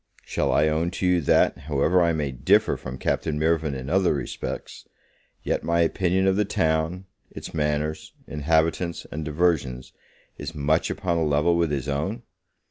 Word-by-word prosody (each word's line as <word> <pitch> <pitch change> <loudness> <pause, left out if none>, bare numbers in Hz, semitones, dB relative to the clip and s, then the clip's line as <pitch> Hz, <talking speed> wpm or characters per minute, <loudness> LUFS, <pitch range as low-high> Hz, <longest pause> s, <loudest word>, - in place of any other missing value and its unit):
Shall - - 0
I 75 - +3
own 80 +2 +1
to - - -1
you, 90 -1 +3
that, 70 - +3
however 80 +5 +3
I 85 -1 +3
may 75 -4 -1
differ 65 - +3
from 65 -1 -7
Captain 75 +3 -1
Mirvan 80 -2 +1
in 65 0 -6
other 90 -1 +2
respects, 70 - -6 0.6
yet - - -1
my 85 0 +2
opinion 90 +3 +1
of 95 0 +2
the 105 - +3
town, 80 -1 0 0.2
its - - -9
manners, 75 0 -2
inhabitants, 80 +3 0
and 80 +1 -4
diversions, 75 -5 -1 0.5
is 85 - -6
much 75 +2 +1
upon 85 -3 -1
upon - - +1
a - - +1
level 75 +4 +3
with 85 -2 +1
his 70 -2 -2
own? 95 +12 -2
80 Hz, 170 wpm, -25 LUFS, 75-85 Hz, 0.6 s, I